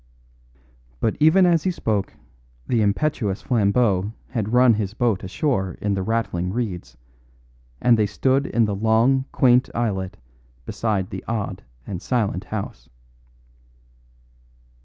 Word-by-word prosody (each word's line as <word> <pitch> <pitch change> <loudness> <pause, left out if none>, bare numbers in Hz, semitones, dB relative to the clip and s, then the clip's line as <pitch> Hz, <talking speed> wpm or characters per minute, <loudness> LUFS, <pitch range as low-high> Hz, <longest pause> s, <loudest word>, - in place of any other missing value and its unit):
But 110 - 0
even 160 +5 +5
as 170 -3 +3
he 190 - 0
spoke 105 - -2 0.5
the 115 - +1
impetuous 105 -1 0
Flambeau 105 -3 +1 0.2
had 110 -4 -3
run 125 -1 +5
his 105 -1 -3
boat 115 -6 0
ashore 95 - -1
in 100 -1 -1
the 95 - -1
rattling 95 -4 -1
reeds, 105 -6 -4 0.8
and 120 -2 +4
they 105 - +3
stood 130 +6 +1
in 115 -1 +2
the 105 - -2
long, 115 +6 +2
quaint 125 -1 +3
islet 95 -6 -2 0.5
beside 100 -5 -2
the 95 - -6
odd 110 -3 -3 0.2
and 90 -3 -6
silent 105 -6 -1
house. 110 -2 -6
110 Hz, 125 wpm, -22 LUFS, 100-125 Hz, 0.8 s, even